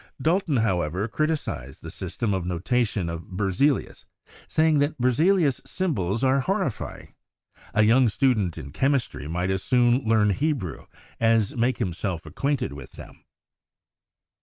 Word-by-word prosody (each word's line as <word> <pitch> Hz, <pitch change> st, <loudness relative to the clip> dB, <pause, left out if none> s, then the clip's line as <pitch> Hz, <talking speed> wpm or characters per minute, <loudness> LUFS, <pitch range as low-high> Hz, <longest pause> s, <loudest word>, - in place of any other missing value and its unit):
Dalton, 160 Hz, 0 st, +1 dB
however, 95 Hz, -3 st, 0 dB
criticized 145 Hz, -, -3 dB
the -, -, -6 dB
system 110 Hz, -4 st, -3 dB
of 95 Hz, -2 st, -1 dB
no 90 Hz, 0 st, -2 dB
tation 105 Hz, -1 st, 0 dB
of 85 Hz, 0 st, -5 dB
Berzelius, 100 Hz, +9 st, 0 dB, 0.4 s
saying 155 Hz, -1 st, +3 dB
that 145 Hz, +1 st, 0 dB
"Berzelius' 145 Hz, +4 st, +3 dB
symbols 115 Hz, -, -1 dB
are 135 Hz, +1 st, +3 dB
horrifying; 190 Hz, -, -3 dB, 0.6 s
a 110 Hz, -, +5 dB
young 120 Hz, +3 st, +5 dB
student 105 Hz, -7 st, +1 dB
in 70 Hz, -, -8 dB
chemistry 130 Hz, -, 0 dB
might 90 Hz, +4 st, -1 dB
as 95 Hz, 0 st, -1 dB
soon 125 Hz, +2 st, +3 dB
learn 110 Hz, -2 st, +3 dB
Hebrew 125 Hz, -, -2 dB, 0.3 s
as 115 Hz, -2 st, +2 dB
make 120 Hz, +2 st, +1 dB
himself 90 Hz, -1 st, -3 dB
acquainted 130 Hz, -, -2 dB
with 70 Hz, -2 st, -10 dB
them." -, -, -13 dB
115 Hz, 135 wpm, -25 LUFS, 95-140 Hz, 0.6 s, a